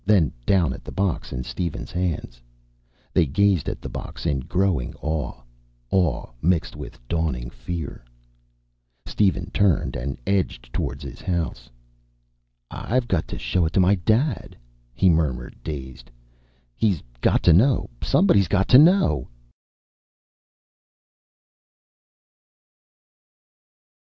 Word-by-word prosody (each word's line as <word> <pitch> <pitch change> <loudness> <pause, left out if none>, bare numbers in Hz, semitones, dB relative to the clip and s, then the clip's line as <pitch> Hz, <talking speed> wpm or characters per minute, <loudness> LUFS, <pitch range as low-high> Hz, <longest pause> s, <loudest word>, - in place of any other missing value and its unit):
Then 95 - +3 0.2
down 85 -9 +3
at - - -10
the - - -8
box 95 -2 -1
in 65 -1 -3
Steven's 70 +7 -4
hands. 85 -9 -3 0.7
They 80 - +3
gazed 95 +3 +2
at - - -6
the - - -4
box - - -7
in 75 -5 +1
growing 90 -2 0
awe. 75 -5 -4 0.5
Awe 90 -5 +1 0.2
mixed 85 0 +1
with - - -9
dawning 65 -8 -2
fear. 70 +4 -6 1.0
Steven 95 -4 0
turned 100 -6 +2
and 65 +3 -4
edged 90 -11 -1
toward 70 +4 -3
his 70 -3 -9
house. 85 -9 -3 1.0
"I've 125 +1 -1
got 90 -7 0
to - - -6
show 90 - 0
it - - -5
to - - +3
my 95 +2 +5
Dad," 110 - 0 0.4
he 95 - +3
murmured, 75 -8 +1
dazed. 65 -5 -7 0.7
"He's 100 - +1 0.2
got - - +2
to 85 - +6
know. 120 - +4
Somebody's 100 -1 +4
got 95 +3 +1
to 130 - +9
know!" 185 +5 +4
85 Hz, 115 wpm, -23 LUFS, 70-100 Hz, 1.0 s, to